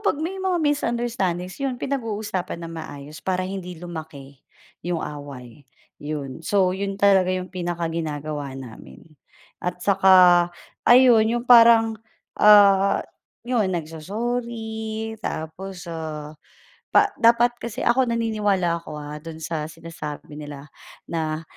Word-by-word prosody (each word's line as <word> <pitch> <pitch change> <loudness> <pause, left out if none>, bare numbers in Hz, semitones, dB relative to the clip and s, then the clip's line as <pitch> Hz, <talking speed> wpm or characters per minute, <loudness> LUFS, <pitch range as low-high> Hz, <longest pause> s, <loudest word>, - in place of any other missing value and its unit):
pag - - -10
may 370 +4 -3
mga 375 -2 0
misunderstandings 235 - -1
yun 270 -2 -1
pinag-uusapan 215 -9 -3
ng 165 0 -7
maayos 150 -2 -8
para 185 -1 -1
hindi 185 -1 -6
lumaki 155 -5 -9 0.5
yung 175 -2 -1
away, 140 -3 -9 0.3
yun. 145 -1 -5
So 195 -3 +3
yun 195 +1 -3
talaga 195 -2 +4
yung 185 0 -4
pinakaginagawa 160 -5 -4
namin 110 - -11 0.6
at 180 0 -4
saka 190 -1 +5 0.7
ayun 240 -3 +7
yung 240 +1 -1
parang, 230 -2 +6 0.4
ah, 200 -2 +6 0.4
yun 240 -4 +1
nagso-sorry, 220 +6 -4
tapos, 180 +4 -6
ah, 155 -2 -6 0.9
dapat 235 +1 +5
kasi 235 +2 -5
ako 250 +2 +3
naniniwala 210 -7 0
ako, 155 -2 -9
ah, 150 0 -7
dun 165 -1 -8
sa 155 -1 -3
sinasabi 155 -2 -8
nila 145 -1 -9 0.4
na 160 -1 -2
185 Hz, 115 wpm, -23 LUFS, 155-225 Hz, 0.9 s, ayun